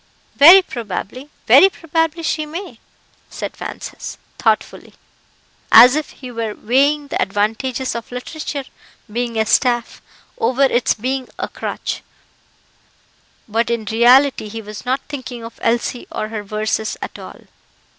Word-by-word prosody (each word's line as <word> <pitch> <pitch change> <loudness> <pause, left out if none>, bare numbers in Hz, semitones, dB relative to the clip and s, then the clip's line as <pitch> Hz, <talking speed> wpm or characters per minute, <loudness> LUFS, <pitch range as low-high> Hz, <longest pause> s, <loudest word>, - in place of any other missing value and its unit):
"Very 350 +7 +9
probably 240 - -6 0.2
very 385 - +7
probably 325 -1 -2
she 310 -1 -1
may;" 320 - -8 0.5
said - - -6
Francis, - - -7 0.2
thoughtfully, - - -1 0.8
as 250 +4 +9
if 305 -1 -2
he 255 -2 -10
were 230 -3 -4
weighing 285 +5 +1
the - - -2
advantages 225 +6 -1
of 235 0 -7
literature 280 +3 -5 0.5
being 235 -1 -2
a 220 - +2
staff, 240 +1 +1 0.4
over 255 +4 +1
its 250 -2 +2
being 255 +3 -3
a - - -3
crutch, - - -5 1.5
but 230 +2 0
in 235 -2 -2
reality 240 +3 +4
he 225 +2 -6
was 210 +2 -9
not 260 +2 0
thinking 255 -5 -7
of 230 - -10
Elsie 240 +1 -1
or 215 - -4
her 220 -1 -4
verses, 215 +1 -2
at - - -7
all. - - -11
245 Hz, 135 wpm, -19 LUFS, 225-280 Hz, 1.5 s, Very